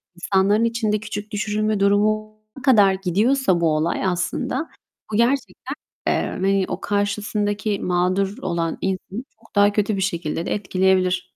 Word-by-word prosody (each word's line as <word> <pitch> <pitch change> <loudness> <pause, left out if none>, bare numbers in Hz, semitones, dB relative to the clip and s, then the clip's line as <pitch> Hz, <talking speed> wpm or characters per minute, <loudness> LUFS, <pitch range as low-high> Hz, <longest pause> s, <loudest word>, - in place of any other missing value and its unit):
insanların 195 +4 +2
içinde 225 -2 0
küçük 210 0 -6
düşürülme 215 0 -1
durumuna 215 +2 +2 0.3
kadar 205 -8 +5
gidiyorsa 195 +1 +1
bu 160 -2 +3
olay 160 +5 0
aslında 185 - -1 0.4
bu - - +1
gerçekten, 250 +3 0 0.3
eee, - - +1
hani 195 0 +1
o - - -4
karşısındaki 205 0 -1
mağdur 185 +3 0
olan 170 -3 -2
insanı 190 +4 -3 0.2
çok 225 - -23
daha 205 0 +5
kötü 210 0 +1
bir 195 - -2
şekilde 170 -3 -2
de - - -1
etkileyebilir. 185 -2 +1
200 Hz, 135 wpm, -22 LUFS, 185-215 Hz, 0.4 s, kadar